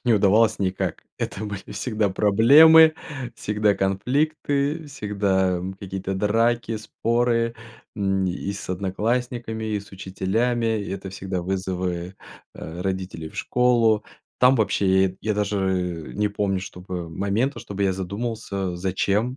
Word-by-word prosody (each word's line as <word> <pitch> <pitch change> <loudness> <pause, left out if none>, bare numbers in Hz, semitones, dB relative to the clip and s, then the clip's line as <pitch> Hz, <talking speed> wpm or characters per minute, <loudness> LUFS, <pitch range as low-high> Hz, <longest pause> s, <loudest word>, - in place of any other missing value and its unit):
не 120 - +4
удавалось 105 +2 +4
никак. 95 -1 -2 0.2
Это 105 - -4
были 100 -2 -6
всегда 110 -4 -1
проблемы, 145 +12 +7 0.4
всегда 105 0 +1
конфликты, 140 - 0
всегда, 100 -7 0
м, 95 +2 -5
какие-то 95 0 -5
драки, 115 +3 +1
споры. 115 +1 0 0.4
М, 95 -1 0
и 95 +2 -3
с 100 - -8
одноклассниками, 110 +4 -2
и 105 - -1
с 100 - -15
учителями. 110 +5 -1
И - - -6
это 95 -1 -5
всегда 95 -2 -4
вызовы, 90 -1 -3 0.4
э, 80 +2 -8
родителей 95 -4 -4
в - - -16
школу. 120 -4 +2 0.3
Там 125 +1 +6
вообще, 105 -3 +1 0.2
и 95 - -6
я 110 -1 -1
даже, 105 0 -1
э, 90 -4 -2
не 105 0 +1
помню, 100 -2 -1
чтобы 90 -2 -7
момента, 105 - -1
чтобы 100 -3 -5
я 95 - +2
задумался, 100 -1 -4
зачем 100 +6 0
100 Hz, 135 wpm, -24 LUFS, 95-115 Hz, 0.4 s, проблемы